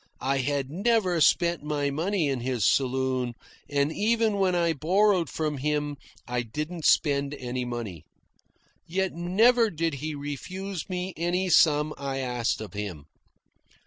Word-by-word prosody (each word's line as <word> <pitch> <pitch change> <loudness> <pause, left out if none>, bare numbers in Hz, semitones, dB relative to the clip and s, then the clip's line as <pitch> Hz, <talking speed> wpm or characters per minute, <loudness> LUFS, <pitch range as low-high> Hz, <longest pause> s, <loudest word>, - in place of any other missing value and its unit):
I 135 +1 +1
had 140 0 -1
never 190 -2 +1
spent 170 +2 +3
my 145 -1 -1
money 170 +3 0
in 135 -2 -1
his 120 -4 -1
saloon, 130 -2 +1 0.3
and 145 +2 +1
even 220 +1 +1
when 190 -2 +2
I 170 -1 +2
borrowed 185 +4 +2
from 150 -3 -2
him 150 +1 -1 0.3
I 125 0 -1
didn't 150 +8 -5
spend 140 -1 +3
any 125 -1 -4
money. 110 -10 -6 0.8
Yet 190 +2 -1
never 220 +8 +3
did 165 -3 -1
he 155 0 -3
refuse 180 +7 -5
me 180 0 -3
any 180 +3 0
sum 150 -1 +4
I 135 -1 -3
asked 125 -4 -1
of 105 -4 -8
him. 100 -8 -5
150 Hz, 145 wpm, -27 LUFS, 130-180 Hz, 0.8 s, sum